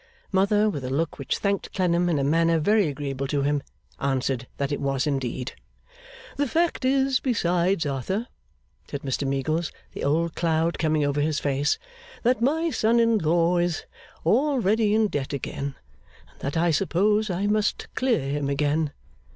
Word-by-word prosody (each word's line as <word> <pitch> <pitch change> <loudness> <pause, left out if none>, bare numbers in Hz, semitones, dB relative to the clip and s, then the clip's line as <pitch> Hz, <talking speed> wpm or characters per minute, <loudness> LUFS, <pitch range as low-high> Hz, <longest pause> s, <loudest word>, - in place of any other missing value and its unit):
Mother, 205 +2 +3
with 145 -10 -2
a 125 - -3
look 150 +4 -1
which 140 - -1
thanked 200 -1 -1
Clennam 175 -2 +2
in 165 - +1
a 140 - +1
manner 165 +3 +3
very 205 +4 +3
agreeable 140 -1 -3
to 140 0 0
him, 145 0 +1 0.4
answered 130 -2 -1
that 140 0 -1
it 145 - -2
was 135 -1 0
indeed. 135 -2 -2 0.9
'The 285 0 +1
fact 335 +2 0
is, 265 -1 +3
besides, 180 - +1
Arthur,' 150 - -2 0.6
said 140 - -5
Mr 135 0 -1
Meagles, 155 +5 -1 0.2
the - - -6
old 160 +3 +1
cloud 165 0 0
coming 155 -2 +2
over 145 +1 0
his 155 0 0
face, 140 +1 +1 0.5
'that 245 0 +2
my 320 +6 +1
son 230 -1 +2
in 230 -1 +3
law 170 +1 +2
is 175 -1 -1 0.4
already 220 - +3
in 220 0 +4
debt 145 -7 -3
again, 140 0 -4 0.6
and - - -26
that 140 +4 -3
I 170 +1 +3
suppose 205 +5 +2
I 185 +2 -1
must 210 0 0
clear 240 - +1
him 140 0 -1
again. 145 +1 0
165 Hz, 165 wpm, -25 LUFS, 140-210 Hz, 0.9 s, in